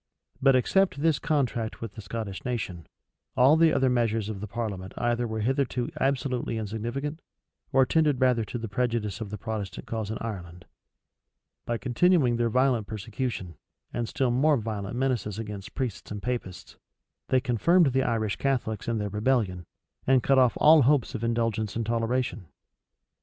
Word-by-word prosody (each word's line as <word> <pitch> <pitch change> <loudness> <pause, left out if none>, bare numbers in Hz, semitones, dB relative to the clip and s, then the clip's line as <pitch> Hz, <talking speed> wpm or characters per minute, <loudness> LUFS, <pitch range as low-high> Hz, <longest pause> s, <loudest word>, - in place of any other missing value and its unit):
But 135 -1 +5
except 155 +3 +2
this 160 -3 +3
contract 125 -8 -1
with 115 -3 -6
the 110 - -8
Scottish 100 -1 -5
nation, 100 - -4 0.5
all 130 +4 +6
the 160 0 +5
other 135 - +2
measures 115 -4 +1
of 100 -3 -5
the 105 - -4
parliament 100 -4 -5
either 120 0 0
were 110 -1 -3
hitherto 125 0 0
absolutely 130 -3 0
insignificant, 120 +9 -4 0.5
or 135 -1 +5
tended 150 -3 +2
rather 125 -3 +3
to 115 - -5
the 115 -1 -5
prejudice 115 -1 -1
of 110 - -4
the 105 - -5
Protestant 105 -2 -5
cause 110 -2 -4
in 110 - -3
Ireland. 90 -6 -7 1.0
By 120 - 0
continuing 130 0 +3
their 120 0 +1
violent 125 -3 +2
persecution, 110 - -4 0.4
and 120 -1 -2
still 130 -3 0
more 145 +4 +3
violent 105 -2 -4
menaces 120 -6 -1
against 105 -1 -7
priests 125 -7 -4
and 105 - -5
Papists, 120 -7 -5 0.5
they 130 - +3
confirmed 135 - +3
the 130 - +3
Irish 110 -5 0
Catholics 125 -6 -1
in 115 -1 0
their 105 -1 -2
rebellion, 105 -5 0 0.4
and 130 -1 +4
cut 135 -1 +4
off 125 -2 +3
all 155 0 +7
hopes 135 -1 +2
of 110 - -4
indulgence 115 -2 -1
and 115 0 -1
toleration. 115 -3 -1
115 Hz, 165 wpm, -27 LUFS, 110-130 Hz, 1.0 s, all